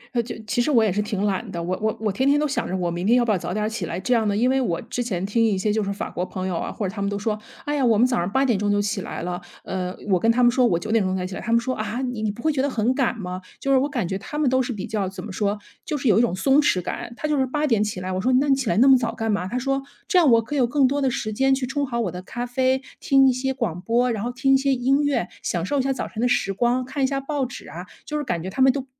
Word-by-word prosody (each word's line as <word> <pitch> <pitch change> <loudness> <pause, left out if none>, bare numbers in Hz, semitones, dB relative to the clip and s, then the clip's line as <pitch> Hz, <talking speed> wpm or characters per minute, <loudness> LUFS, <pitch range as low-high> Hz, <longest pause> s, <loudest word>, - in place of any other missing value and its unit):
那 235 - +3
就 235 - -7
其 240 +3 0
实 240 - 0
我 240 -6 +4
也 215 - +2
是 205 +3 0
挺 205 -1 -2
懒 205 +1 -2
的， 170 -2 -4
我 180 +2 -1
我 220 0 0
我 215 -2 0
天 265 +7 +1
天 290 +1 +4
都 300 - +1
想 285 - -2
着 190 - -2
我 175 -2 -1
明 175 +2 -3
天 240 +3 +5
要 240 - +3
不 225 - +1
要 200 - +2
早 175 +1 -5
点 210 +1 0
起 215 -6 -4
来。 170 - -4
这 250 - 0
样 225 -3 +2
呢， 205 0 +1
因 245 +3 +3
为 265 +1 +2
我 170 -9 -1
之 235 +2 -4
前 190 -7 -2
听 230 +3 +1
一 215 -4 +2
些 205 +2 0
就 220 - 0
是 200 - -2
法 200 - -5
国 180 - -3
朋 185 0 -4
友 180 - -2
啊， - - -3
或 200 - -3
者 185 - -6
他 205 - -5
们 200 - 0
都 205 - -2
说： 210 +1 -2 0.3
“哎 295 - -1
呀， 280 - +1
我 230 -4 +4
们 240 - +5
早 250 -1 +1
上 175 +3 -2
8:00 215 -6 +2
就 205 - +2
起 205 -1 -1
来 - - -6
了”， 175 0 -3 0.2
呃， 185 0 -3
我 190 -3 +3
跟 225 +5 +3
他 245 +2 +2
们 240 - +6
说 250 0 +3
我 175 - +2
9:00 210 -1 0
才 180 -1 -2
起 185 - -6
来。 - - -5
他 230 - -4
们 235 - +5
说： 255 +2 -2
“啊， 215 +3 -3
你 250 -4 -3
你 215 - 0
不 210 +3 -7
会 315 - +3
觉 270 -3 0
得 285 - +1
很 240 -1 +1
赶 260 -3 0
吗？” 185 -3 -5 0.2
就 275 - -1
是 270 - +6
我 280 +3 0
感 240 - -2
觉 190 - -3
他 295 - -7
们 300 -3 +2
都 260 +1 +3
是 250 - -2
比 205 -4 -4
较 200 -4 -2
怎 190 - -8
么 215 - -7
说， 205 +2 -1 0.3
就 300 - -3
是 260 - -2
有 210 -1 +5
一 - - +5
种 225 -6 +1
松 270 +9 +4
弛 190 - +2
感。 180 - -5
他 305 - -2
就 300 - +1
是 265 - +2
8:00 265 -6 +1
起 210 -3 -3
来， 185 +1 -4
我 185 0 -1
说： 255 - +1
“那 285 - +1
你 270 - +5
起 265 -4 -2
来 - - +1
那 255 +5 +6
么 270 - +8
早 235 -2 0
干 225 -1 -1
嘛”， 185 -3 -1
他 245 - -2
说： 270 +2 0 0.3
“这 365 - +4
样 325 -5 +5
我 230 -1 +5
可 225 - -7
以 285 - +1
有 245 - +3
更 270 +2 +3
多 285 +2 -1
的 265 - +2
时 215 -3 -3
间 270 +4 +3
去 265 -1 -2
冲 275 +2 -2
好 235 -1 -2
我 190 -7 -1
的 180 - -7
咖 240 +6 -5
啡， 260 +2 +1 0.2
听 270 -1 +4
一 260 - +4
些 265 +2 -1
广 230 -10 -3
播， 240 +5 +1
然 215 -1 -3
后 245 - -2
听 265 +2 +2
一 - - +7
些 270 0 +1
音 270 +4 +2
乐， 280 -11 0
享 170 -1 -2
受 285 +8 0
一 - - +3
下 270 +1 0
早 265 - -3
晨 220 - -6
的 245 - +3
时 245 -5 +1
光， 245 +4 +1
看 265 +1 -3
一 - - +4
下 275 0 -1
报 275 -1 -2
纸 245 - -10
啊。” 175 +5 -8 0.2
就 300 - -5
是 295 - -2
感 175 -11 -2
觉 185 - -4
他 260 - -2
们 265 0 +7
都 270 0 -4
235 Hz, 365 characters per minute, -23 LUFS, 200-265 Hz, 0.3 s, 么